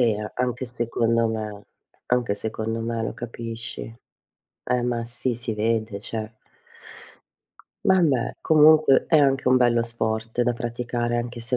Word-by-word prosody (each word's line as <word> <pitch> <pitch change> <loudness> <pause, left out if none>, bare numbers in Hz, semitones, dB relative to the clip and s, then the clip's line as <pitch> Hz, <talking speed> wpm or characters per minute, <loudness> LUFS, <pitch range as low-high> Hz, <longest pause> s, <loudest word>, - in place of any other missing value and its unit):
E - - +5 0.2
a 105 - -6
anche 125 0 -2
secondo 115 -1 0
me. 105 -2 -5 0.4
Anche 120 -4 +1
secondo 110 +1 -3
me 115 0 -2
lo - - -4
capisci. 115 -1 -6 0.8
Eh, 125 -1 0
ma 120 -1 -1
sì, 120 +1 -2
si 120 -1 0
vede, 110 -1 -1
cioè. 110 +1 -4 1.5
Vabbè, 165 -10 +2
comunque 155 -2 +5
è 165 - +4
anche 135 -2 +3
un 130 - +5
bello 120 -1 +3
sport 115 0 -2
da 125 - +1
praticare, 120 0 -2
anche 120 0 -5
se 115 +2 0
120 Hz, 140 wpm, -24 LUFS, 115-125 Hz, 1.5 s, E